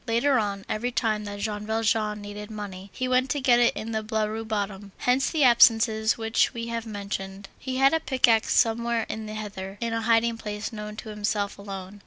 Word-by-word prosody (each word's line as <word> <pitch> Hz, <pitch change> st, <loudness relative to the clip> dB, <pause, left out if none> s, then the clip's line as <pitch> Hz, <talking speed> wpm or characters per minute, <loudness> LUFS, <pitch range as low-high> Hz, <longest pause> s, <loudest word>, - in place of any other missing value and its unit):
Later 240 Hz, +3 st, +3 dB
on, 200 Hz, -2 st, -3 dB
every 240 Hz, +3 st, -2 dB
time 215 Hz, -3 st, 0 dB
that 205 Hz, 0 st, -6 dB
Jean 210 Hz, 0 st, -3 dB
Valjean 220 Hz, -1 st, 0 dB
needed 205 Hz, +1 st, -8 dB
money, 200 Hz, -3 st, -7 dB
he 255 Hz, -, -3 dB
went 255 Hz, +1 st, +2 dB
to 290 Hz, -, 0 dB
get 250 Hz, -3 st, +4 dB
it 240 Hz, -, +3 dB
in 225 Hz, +1 st, -5 dB
the 220 Hz, -1 st, -1 dB
Blaru 220 Hz, 0 st, -2 dB
bottom. 205 Hz, -2 st, -3 dB
Hence 255 Hz, +2 st, +2 dB
the 315 Hz, -3 st, +1 dB
absences 225 Hz, -2 st, +5 dB
which 225 Hz, +3 st, +1 dB
we 230 Hz, 0 st, -4 dB
have 230 Hz, 0 st, -4 dB
mentioned. 200 Hz, -2 st, -6 dB
He 260 Hz, -1 st, -4 dB
had 270 Hz, +2 st, +5 dB
a 320 Hz, -, +3 dB
pickaxe 245 Hz, -7 st, +2 dB
somewhere 235 Hz, 0 st, +2 dB
in 220 Hz, 0 st, -5 dB
the 215 Hz, -, -6 dB
heather, 200 Hz, -2 st, -6 dB
in 230 Hz, -1 st, -2 dB
a 230 Hz, -, -1 dB
hiding 230 Hz, 0 st, +2 dB
place 210 Hz, +1 st, -5 dB
known 210 Hz, -1 st, -6 dB
to 220 Hz, +1 st, -8 dB
himself 205 Hz, -1 st, -2 dB
alone. 195 Hz, 0 st, -8 dB
220 Hz, 205 wpm, -26 LUFS, 205-235 Hz, -, absences